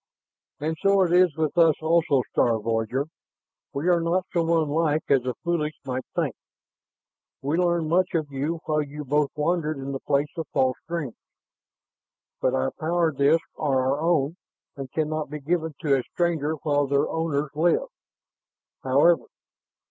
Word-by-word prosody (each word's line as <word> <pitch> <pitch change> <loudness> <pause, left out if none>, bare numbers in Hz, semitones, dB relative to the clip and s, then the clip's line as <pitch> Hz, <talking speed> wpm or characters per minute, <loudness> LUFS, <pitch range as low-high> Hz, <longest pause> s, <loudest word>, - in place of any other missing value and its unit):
"And 155 +2 -2
so 195 -1 +4
it 175 -1 0
is 180 -4 +4
with 155 -2 -1
us 165 -3 +6
also, 160 -5 +2
star 115 -2 +2
voyager. 115 +5 -1 0.7
We 145 +5 -3
are 175 -2 +4
not 175 +2 0
so 165 -1 +2
unlike 155 0 +1
as 135 -2 +4
the 125 -1 -3
foolish 160 -3 -1
might 130 -1 -3
think. - - 0 1.1
We 150 +5 0
learned 170 -2 +1
much 180 +3 +1
of 155 -3 -1
you 150 +5 -2
while 155 -1 +1
you 150 0 -7
both 145 +1 +1
wandered 155 0 0
in 135 0 -5
the 135 - -3
Place 140 +4 -1
of 165 - -3
False 130 -1 +2
Dreams. 165 -8 -3 1.3
But - - +2
our 65 0 0
power 165 +1 +1
disks 145 +4 +2
are 140 -4 +1
our 145 +2 -1
own 165 -1 +1 0.4
and 135 -3 -7
can 155 -1 0
not 155 -1 -3
be 150 +1 -5
given 160 +1 -1
to 145 -4 +3
a 135 - +1
stranger 160 +1 -1
while 145 -2 +1
their 140 0 +2
owners 150 -3 -1
live. 165 +3 +1 0.9
However...." 145 +6 +3
155 Hz, 165 wpm, -25 LUFS, 140-165 Hz, 1.3 s, us